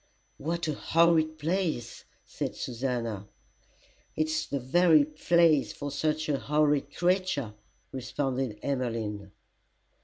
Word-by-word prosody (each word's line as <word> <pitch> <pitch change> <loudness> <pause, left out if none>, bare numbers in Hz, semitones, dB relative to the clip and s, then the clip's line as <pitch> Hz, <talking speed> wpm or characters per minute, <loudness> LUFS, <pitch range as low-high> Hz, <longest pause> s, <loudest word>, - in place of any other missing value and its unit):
"What 170 +3 -2
a 155 - 0
horrid 160 0 +2
place!" 160 -7 -2 0.2
said - - -4
Susannah. 115 -5 -3 0.9
"It's 155 0 -1
the 140 - -2
very 155 +3 +4
place 155 0 +3
for 145 0 -5
such 155 +2 -1
a 145 -3 0
horrid 150 -1 +1
creature," 175 - 0 0.4
responded 130 -2 -2
Emmeline. 115 -7 -2
145 Hz, 100 wpm, -28 LUFS, 125-160 Hz, 0.9 s, very